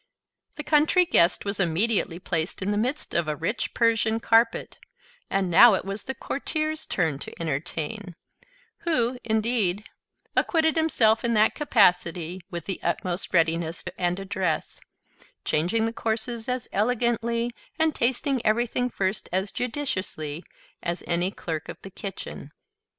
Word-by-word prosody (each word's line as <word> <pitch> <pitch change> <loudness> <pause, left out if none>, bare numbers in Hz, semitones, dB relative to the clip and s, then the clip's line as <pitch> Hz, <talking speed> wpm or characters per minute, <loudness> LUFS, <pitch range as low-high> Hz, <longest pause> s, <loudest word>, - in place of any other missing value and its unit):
The 300 - -5
Country 315 +5 +4
Guest 175 - +3
was 200 0 -2
immediately 185 0 +1
placed 175 0 -3
in 200 - 0
the - - 0
midst 250 +8 -2
of 170 -2 +1
a 150 - -1
rich 210 - -3
Persian 225 -1 +2
carpet: 230 0 +2 0.5
and 190 -2 0
now 225 +5 +8
it - - -3
was 195 +2 -5
the 265 - -4
Courtier's 310 +4 -3
turn 160 -6 0
to - - -8
entertain; 165 +5 -3 0.6
who 250 -7 0
indeed 220 -3 +1 0.5
acquitted 320 -1 +2
himself 245 -9 +3
in 235 -1 +1
that 215 +1 +4
capacity 180 - +2
with 170 -2 -6
the 190 - -4
utmost 180 0 -2
readiness 165 -1 +1
and 180 +1 -1
address, 195 -1 -2 0.6
changing 180 +9 +1
the 225 - -2
courses 225 +1 -3
as 250 -1 -2
elegantly, 235 +1 0 0.3
and 320 -1 +2
tasting 260 +1 0
everything 240 +3 +1
first 195 -3 -2
as 190 +3 0
judiciously, 185 - -3 0.4
as 170 0 -3
any 175 +2 0
clerk 160 -5 -5
of - - -7
the 195 - -9
kitchen. 195 +1 -7
215 Hz, 140 wpm, -26 LUFS, 175-240 Hz, 0.6 s, now